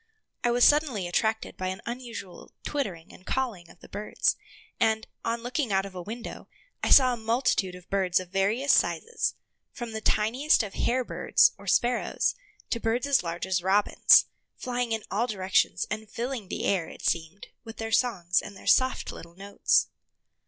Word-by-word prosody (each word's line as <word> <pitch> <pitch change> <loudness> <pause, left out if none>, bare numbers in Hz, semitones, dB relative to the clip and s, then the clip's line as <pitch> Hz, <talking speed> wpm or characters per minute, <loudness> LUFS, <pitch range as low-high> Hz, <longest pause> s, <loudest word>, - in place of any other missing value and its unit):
I 240 - +3
was 240 +1 +2
suddenly 280 - +3
attracted 220 +5 -1
by 185 - -3
an 185 0 -4
unusual 235 -6 -7
twittering 195 - -4
and - - -15
calling 215 -9 -3
of 175 - -18
the - - -13
birds, 210 +2 -1 0.4
and, 220 0 +2 0.2
on 230 0 -2
looking 250 0 -2
out 195 0 +2
of 195 - -9
a 180 - -6
window, 225 +6 -8 0.4
I - - +1
saw 255 -2 +7
a - - -4
multitude 225 -5 0
of 180 0 -14
birds 190 -3 +2
of 185 -1 -8
various 205 +9 +2
sizes, 465 0 +1 0.4
from 240 -3 -7
the 220 0 -5
tiniest 240 +7 +2
of 200 -2 -7
hare 255 +1 0
birds, 485 - +3
or - - -13
sparrows, 240 0 +1 0.4
to 235 - 0
birds 230 +3 0
as 280 -1 +3
large 170 0 -4
as 185 -1 0
robins, 195 +3 +5 0.3
flying 245 -2 -3
in 220 -1 -1
all 225 +5 0
directions 190 -4 +1
and 215 0 -4
filling 235 -2 -4
the - - -4
air, 180 -5 0
it - - -12
seemed, 165 +4 -2
with 225 -1 -10
their 225 0 -4
songs 185 -8 +2
and 200 -2 -10
their - - -14
soft 260 0 +2
little 170 0 -12
notes. 200 +2 +2
220 Hz, 180 wpm, -27 LUFS, 190-245 Hz, 0.4 s, saw